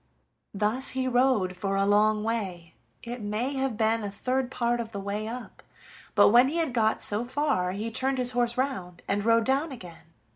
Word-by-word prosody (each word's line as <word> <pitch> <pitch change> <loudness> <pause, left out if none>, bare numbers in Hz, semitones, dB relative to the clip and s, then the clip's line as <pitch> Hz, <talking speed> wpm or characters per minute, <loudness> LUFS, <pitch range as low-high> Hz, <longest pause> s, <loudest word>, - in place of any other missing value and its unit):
Thus 215 +6 +1
he 260 0 0
rode 245 -7 +2
for 195 +2 -2
a 195 0 +2
long 210 +1 +3
way 190 -7 -4 0.3
it 240 0 -6
may 215 +6 -2
have 265 -4 -2
been 225 0 +1
a 205 - -3
third 255 +5 -2
part 240 -2 -1
of 225 -1 -6
the 200 - -4
way 205 +2 -4
up 240 +1 -8 0.5
but - - +6
when 240 +4 +6
he 295 - -3
had 320 -6 -1
got 220 -2 +1
so 210 +3 +3
far 255 -8 -1
he 215 +4 -4
turned 265 +3 -1
his 250 -1 +4
horse 240 -1 0
round 190 -10 -3
and 200 +1 -1
rode 230 0 +3
down 280 +5 0
again. 175 - -11
230 Hz, 195 wpm, -27 LUFS, 205-255 Hz, 0.5 s, but